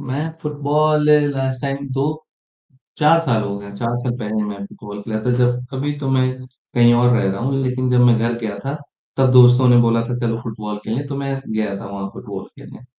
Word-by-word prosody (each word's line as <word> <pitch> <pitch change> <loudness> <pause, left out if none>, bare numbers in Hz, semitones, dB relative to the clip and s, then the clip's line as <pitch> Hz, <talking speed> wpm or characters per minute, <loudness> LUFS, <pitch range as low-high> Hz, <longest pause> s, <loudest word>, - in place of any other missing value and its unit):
मैं 145 +5 -3
football 150 +1 +1 0.2
last 130 -1 -2
time 140 0 -3
2 135 +1 0 1.0
4 165 +2 +5
साल 120 -9 0
हो 100 0 -4
गए, 100 0 -10
4 115 +3 -2
साल 125 0 -2
पहले 110 -2 -2
मैं 100 -1 -6
फुटबॉल 105 0 -10
खेला 110 -1 -3
था 125 - +2
जब 125 0 +1
अभी 145 +2 -2
तो 135 -2 -2
मैं 130 -1 +2 0.5
कहीं 120 -1 +6
और 120 +1 +4
रह 120 -5 +1
रहा 95 +1 -3
हूँ 135 +2 0
लेकिन 130 0 -1
जब 125 0 +4
मैं 120 -1 +5
घर 115 +1 -1
गया 105 -3 -4
था 140 - -2 0.4
तब 130 -1 +4
दोस्तों 125 0 +7
ने 120 - +6
बोला 115 0 +2
था, 125 - -2
"चलो 115 -2 -2
फुटबॉल 105 -2 -5
खेलें" 125 +6 -2
तो 140 - -5
मैं 140 -1 -2
गया 110 -2 -2
था - - -9
वहाँ 100 -1 -5
फुटबॉल - - -8
खेलने। 125 - -13
125 Hz, 215 wpm, -19 LUFS, 110-135 Hz, 1.0 s, दोस्तों